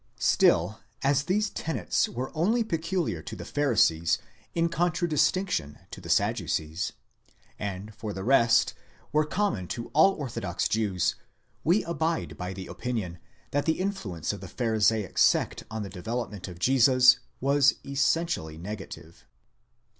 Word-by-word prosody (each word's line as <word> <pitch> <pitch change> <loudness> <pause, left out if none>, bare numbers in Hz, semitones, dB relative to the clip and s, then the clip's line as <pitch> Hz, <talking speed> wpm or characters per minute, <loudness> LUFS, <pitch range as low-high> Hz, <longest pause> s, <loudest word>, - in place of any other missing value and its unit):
'Still 90 +6 +3 0.2
as 140 +1 +2
these 205 +4 +1
tenets 160 - -1
were 125 +2 -4
only 215 +9 +2
peculiar 165 - -2
to - - -7
the - - -8
Pharisees 105 - +2 0.4
in 165 0 +2
contradis 170 -2 +2
tinction 180 - -3
to - - -8
the - - -9
Sadducees, 80 +5 0 0.7
and, 100 +1 -5
for 110 0 -6
the 95 -1 -5
rest, 115 -2 +4 0.4
were 155 +1 +3
common 185 - -1
to 115 - -6
all 160 +6 +6
orthodox 115 - -3
Jews, 105 -5 0 0.5
we 175 +7 +3
abide 165 0 -2
by 90 0 -5
the 95 0 -7
opinion 105 -9 -4 0.3
that 145 0 0
the 160 - +1
influence 120 - -3
of - - -8
the - - -7
Pharisaic 110 -3 +1
sect - - +3
on 110 -1 -4
the - - -5
development 105 +1 -4
of 90 -2 -9
Jesus 130 +3 +5 0.2
was 140 +1 +4
essentially 140 - 0
negative. 95 -3 -9
125 Hz, 140 wpm, -27 LUFS, 95-160 Hz, 0.7 s, all